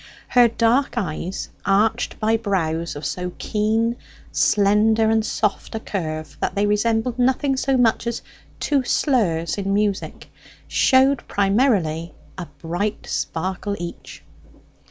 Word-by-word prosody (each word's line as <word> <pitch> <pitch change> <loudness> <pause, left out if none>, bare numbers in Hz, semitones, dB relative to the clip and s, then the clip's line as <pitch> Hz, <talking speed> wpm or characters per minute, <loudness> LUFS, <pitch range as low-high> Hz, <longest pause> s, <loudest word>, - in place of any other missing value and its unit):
Her 245 -2 +6
dark 235 +4 +1
eyes 180 -2 -3
arched 220 +4 +1
by 220 +1 +2
brows 170 -7 -1
of 145 - -6
so 180 -1 -3
keen, 220 +2 0 0.3
slender, 215 +2 +3
and 220 0 +2
soft 210 0 -2
a - - -2
curve, 155 -8 -5
that - - -2
they 200 +1 +2
resembled 225 +3 0
nothing 265 +2 +2
so 265 0 +1
much 235 -1 +2
as 235 - -3 0.4
two 280 -3 +1
slurs 190 - +1
in 195 0 0
music 205 -1 -2 0.4
showed 265 +1 +3
primarily 195 - +1 0.2
a 175 -3 -6 0.2
bright 175 +6 -2
sparkle 190 +4 -3
each. 170 0 -8
210 Hz, 125 wpm, -22 LUFS, 185-235 Hz, 0.4 s, Her